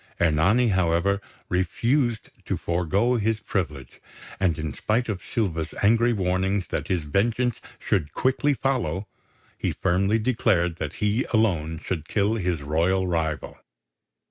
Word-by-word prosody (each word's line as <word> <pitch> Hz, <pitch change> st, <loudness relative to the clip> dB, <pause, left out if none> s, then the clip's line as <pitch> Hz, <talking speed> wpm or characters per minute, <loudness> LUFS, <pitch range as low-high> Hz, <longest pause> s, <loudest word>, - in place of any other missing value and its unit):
Ernani, 95 Hz, +10 st, +3 dB
however, 95 Hz, +1 st, +2 dB, 0.3 s
refused 115 Hz, +6 st, 0 dB
to -, -, -1 dB
forego 95 Hz, +8 st, +1 dB
his 110 Hz, 0 st, 0 dB
privilege; 75 Hz, -, -4 dB, 0.4 s
and 90 Hz, -4 st, +1 dB
in 75 Hz, -2 st, -3 dB
spite 115 Hz, +3 st, 0 dB
of 100 Hz, -5 st, -3 dB
Silva's 85 Hz, -8 st, -2 dB
angry 115 Hz, +3 st, +4 dB
warning 95 Hz, -1 st, 0 dB
that -, -, -3 dB
his 90 Hz, -4 st, 0 dB
vengeance 115 Hz, -, 0 dB, 0.2 s
should 85 Hz, -8 st, -1 dB
quickly 135 Hz, -, +1 dB
follow, 110 Hz, -, -1 dB, 0.5 s
he -, -, 0 dB
firmly 95 Hz, +4 st, +1 dB
declared 105 Hz, -8 st, +1 dB
that -, -, -4 dB
he 105 Hz, +4 st, 0 dB
alone 85 Hz, -8 st, +1 dB
should 80 Hz, -3 st, -3 dB
kill 105 Hz, +1 st, +1 dB
his 90 Hz, -8 st, -1 dB
royal 85 Hz, +6 st, +1 dB
rival. 80 Hz, -3 st, -2 dB
95 Hz, 130 wpm, -25 LUFS, 85-110 Hz, 0.5 s, angry